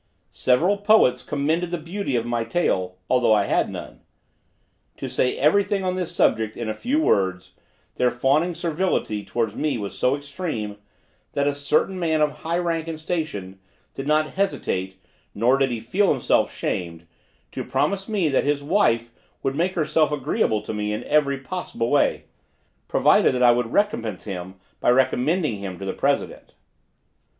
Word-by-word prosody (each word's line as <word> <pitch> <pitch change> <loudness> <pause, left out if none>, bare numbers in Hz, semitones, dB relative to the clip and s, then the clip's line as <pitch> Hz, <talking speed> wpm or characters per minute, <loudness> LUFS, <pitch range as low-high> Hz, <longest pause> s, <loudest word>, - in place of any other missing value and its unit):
Several 160 - +2
poets 205 - +4
commended 155 +5 -1
the 175 - -2
beauty 170 -2 -3
of 115 -1 0
my 120 -1 -1
tail, 95 - -1
although 125 -3 +3
I 105 -1 +3
had - - +1
none. - - -8 1.0
To - - -5
say 125 - 0
everything 200 +6 +2
on 185 -1 0
this 180 -2 -2
subject 110 -9 +1
in 120 - -4
a 110 - -1
few 260 - -1
words 95 - +1 0.4
their 125 - +3
fawning 140 +8 +1
servility 165 - -1
towards 115 -2 -2
me 150 -4 -1
was 100 -3 -5
so 130 +2 +2
extreme, 140 - -5 0.6
that 140 0 +1
a 145 - +2
certain 150 +6 0
man 160 -3 +1
of 150 -1 +1
high 165 +1 -1
rank 165 -2 -1
and 160 -1 -5
station, 155 - -4 0.3
did 135 - -6
not 155 0 +2
hesitate, 95 - -2 0.4
nor 125 +6 +3
did 135 -1 +2
he 120 -2 -3
feel 185 - +1
himself 130 -5 +2
shamed, 85 -2 -4 0.5
to - - -4
promise 195 +1 -1
me 200 -6 +1
that 135 -3 +2
his 145 0 0
wife 130 - +2 0.3
should 135 - 0
make 175 +6 0
herself 155 -2 +2
agreeable 140 - 0
to 105 - -5
me 105 0 -2
in 110 +3 -4
every 145 -2 +2
possible 135 -5 -4
way, 145 - +2 0.6
provided - - +4
that 125 - +1
I 120 - +8
would 120 -1 0
recompense 120 - 0
him 95 -2 -6 0.2
by - - +2
recommending 130 - +2
him 95 -2 -6
to 95 - -7
the 95 - -2
president. - - -2
140 Hz, 165 wpm, -23 LUFS, 115-170 Hz, 1.0 s, I